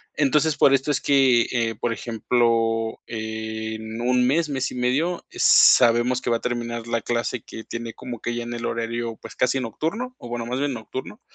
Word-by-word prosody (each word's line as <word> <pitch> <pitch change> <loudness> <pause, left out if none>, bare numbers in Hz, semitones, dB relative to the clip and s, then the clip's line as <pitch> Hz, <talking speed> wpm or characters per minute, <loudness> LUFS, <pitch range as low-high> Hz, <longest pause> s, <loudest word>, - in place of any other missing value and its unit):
Entonces, 150 +1 +2
por 140 - +5
esto 135 +2 +1
es 140 - +1
que, 135 -4 +4
eh, 115 -2 0
por 115 +2 -2
ejemplo, 115 -1 0
en 110 0 -5
un 125 +1 +2
mes, 150 +4 +2
mes 135 -2 -2
y - - -7
medio, 140 +8 0
sabemos 120 +2 +5
que 120 - -1
va 115 - +3
a - - -15
terminar 120 -1 -3
la 115 -1 -1
clase 120 0 -2
que 110 - -9
tiene 115 -1 -6
como 125 -1 -8
que 120 - -3
ya 120 - -3
en 120 0 -6
el 120 0 -4
horario, 115 0 -3
pues - - -10
casi 130 +1 +1
nocturno, 200 - -3
o - - -10
bueno, 120 -1 -4
más 125 +2 -2
bien 145 -1 0
nocturno. 130 - -7
120 Hz, 195 wpm, -23 LUFS, 115-130 Hz, -, por